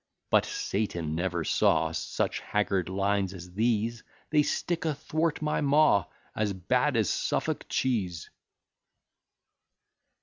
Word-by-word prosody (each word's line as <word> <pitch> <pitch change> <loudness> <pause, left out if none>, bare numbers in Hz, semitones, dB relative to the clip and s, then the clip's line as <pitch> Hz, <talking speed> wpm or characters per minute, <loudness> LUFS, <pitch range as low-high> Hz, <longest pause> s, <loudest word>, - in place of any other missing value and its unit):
But - - +5
Satan 105 - -2
never 85 0 -1
saw - - +2
Such - - -2
haggard 100 -4 0
lines 100 0 0
as 90 0 -10
these: 115 +1 0 0.3
They 150 -1 +5
stick 170 +3 -1
athwart 155 0 -1
my 150 - 0
maw, 145 -6 +4 0.3
As 105 -2 0
bad 125 +9 +1
as 110 -4 +2
Suffolk - - -1
cheese. 95 -10 -1
110 Hz, 110 wpm, -28 LUFS, 95-145 Hz, 0.3 s, But